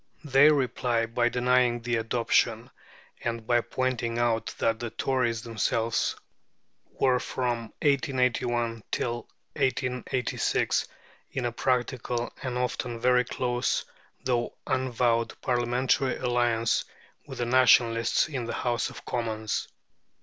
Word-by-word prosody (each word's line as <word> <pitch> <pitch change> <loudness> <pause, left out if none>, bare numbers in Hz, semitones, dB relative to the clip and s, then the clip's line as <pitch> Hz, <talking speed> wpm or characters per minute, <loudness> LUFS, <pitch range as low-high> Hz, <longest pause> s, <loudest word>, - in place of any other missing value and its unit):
They 145 0 +6
reply 125 -4 +1
by 120 +1 +1
denying 125 -1 +2
the 120 -1 0
adoption, 115 +1 +1 0.5
and 115 -1 -3
by 120 0 +3
pointing 120 -2 -2
out 120 -2 +1
that 115 0 +1
the 120 - -3
Tories 120 -2 -1
themselves 115 0 0 0.7
were 125 -1 +2
from 120 -3 -2
1881 125 -5 +1
till 120 0 -2 0.3
1886 125 -1 0 0.5
in 130 - -2
a 120 - 0
practical, 120 -1 -1
and 125 -2 -3
often 125 -1 -2
very 125 +1 +4
close, 125 -1 -1 0.4
though 120 -2 -1
unavowed, 120 -3 0
Parliamentary 125 +1 +1
alliance 120 -2 +1 0.4
with - - -8
the 120 - -1
Nationalists 120 -2 +4
in 130 -6 -4
the 115 - -4
House 120 -1 -1
of - - -12
Commons. 110 -3 -2
120 Hz, 115 wpm, -27 LUFS, 115-125 Hz, 0.7 s, They